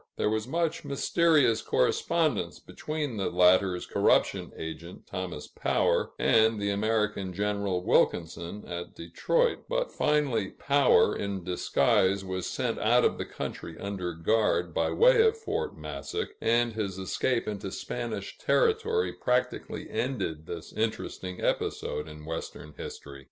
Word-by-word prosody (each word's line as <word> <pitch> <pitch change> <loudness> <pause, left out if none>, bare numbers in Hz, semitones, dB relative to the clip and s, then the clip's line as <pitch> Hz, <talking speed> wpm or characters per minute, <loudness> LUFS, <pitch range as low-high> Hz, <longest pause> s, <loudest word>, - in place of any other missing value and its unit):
There 105 - +1
was 110 +1 -1
much 165 +3 -1
mysterious 145 -3 +3
correspondence 155 - +1
between 150 -6 -5
the 95 - 0
latter's 90 0 +4
corruption - - +2
agent, 80 +2 -7
Thomas 95 -5 -5
Power, - - 0
and 110 -1 +4
the 100 0 0
American 105 -2 0
General 100 -2 -1
Wilkinson, 85 +3 0
at 85 0 -6
Detroit; 485 - 0
but - - -1
finally 140 -9 +1
Power, 140 -1 +3
in 100 -2 -3
disguise, 95 +2 +2
was 95 -1 -3
sent - - -2
out - - +4
of - - +1
the - - -2
country 80 - -6
under 95 -4 -4
guard, 110 +7 +1
by - - +1
way - - +5
of 450 0 +3
Fort 450 +1 -3
Massac, 435 +1 -4
and 120 0 +2
his 100 -4 -3
escape 115 +6 -1
into 105 -1 -4
Spanish - - -5
territory 445 -1 +2
practically 125 0 -1
ended 95 - -3
this 85 -1 -7
interesting 100 -4 -3
episode 75 - -1
in 75 0 -10
Western 80 -1 -6
history. 70 -1 -8
105 Hz, 130 wpm, -28 LUFS, 90-140 Hz, -, way